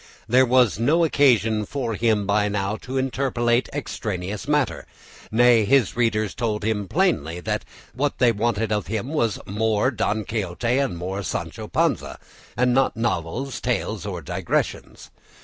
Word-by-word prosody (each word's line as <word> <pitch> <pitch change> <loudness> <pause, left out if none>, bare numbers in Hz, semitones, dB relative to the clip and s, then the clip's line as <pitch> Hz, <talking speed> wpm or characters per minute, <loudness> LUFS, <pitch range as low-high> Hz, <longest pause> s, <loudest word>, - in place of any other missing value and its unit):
There 130 +3 +4
was 120 -6 +3
no 155 +9 +3
occasion 115 - +3
for 120 +1 -3
him 110 -1 +1
now 105 0 0
to 130 +4 -5
interpolate 125 -2 0
extraneous 105 -8 -4
matter; 150 -2 0 0.4
nay, 120 0 +5
his 120 +1 +3
readers 110 -4 +1
told 110 -3 -2
him 105 -2 -1
plainly 90 - 0
that - - -2 0.3
what 140 +4 -1
they 125 -2 +4
wanted 110 0 -1
of 105 -2 -1
him 110 +5 -3
was 120 - 0
more 110 +4 +1
Don 110 -3 -1
Quixote 115 +4 -1
and 135 -11 -1
more 95 +3 -4
Sancho - - -4
Panza, - - 0 0.4
and 125 0 +3
not 135 -2 +2
novels, 115 +4 -2
tales, - - -2
or - - -5
digressions. - - -3
115 Hz, 145 wpm, -23 LUFS, 105-130 Hz, 0.4 s, nay